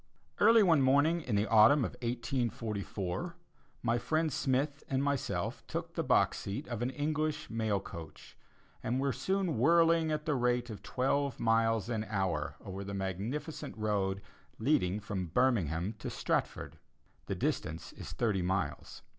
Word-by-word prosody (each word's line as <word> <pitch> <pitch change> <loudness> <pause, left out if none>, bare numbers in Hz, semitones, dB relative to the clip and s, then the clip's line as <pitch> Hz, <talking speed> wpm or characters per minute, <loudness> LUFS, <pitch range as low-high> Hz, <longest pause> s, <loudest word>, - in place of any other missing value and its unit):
Early 225 +1 +7
one 165 -6 +5
morning 145 +6 +4
in 125 -8 -2
the 100 +1 +2
autumn 115 +5 +6
of - - -3
1844, 115 - -3 0.5
my 120 0 +2
friend 155 +2 0
Smith 140 0 0
and 135 0 +1
myself 140 -2 -1
took - - -4
the - - -1
box - - +3
seat 110 +11 -5
of 120 -2 -4
an 120 - 0
English 155 +1 -2
mail 110 -3 0
coach, 85 -5 -10 0.5
and 125 +3 -1
were 135 -1 +1
soon 180 - -1
whirling 165 +3 +4
at 150 0 -2
the 155 - +1
rate 125 -2 +1
of 100 -3 -8
twelve 135 +2 0
miles 115 -1 +2
an 110 -3 -1
hour 95 -8 -1
over 95 +1 -5
the 100 0 -5
magnificent 105 - -4
road 100 -3 -1 0.3
leading 110 -7 +1
from 100 -3 -4
Birmingham 95 - +1
to - - -4
Stratford. - - -2 0.5
The - - -2
distance 80 +1 -2
is - - -8
thirty 105 -6 0
miles. 95 +2 -2
120 Hz, 150 wpm, -32 LUFS, 100-145 Hz, 0.5 s, Early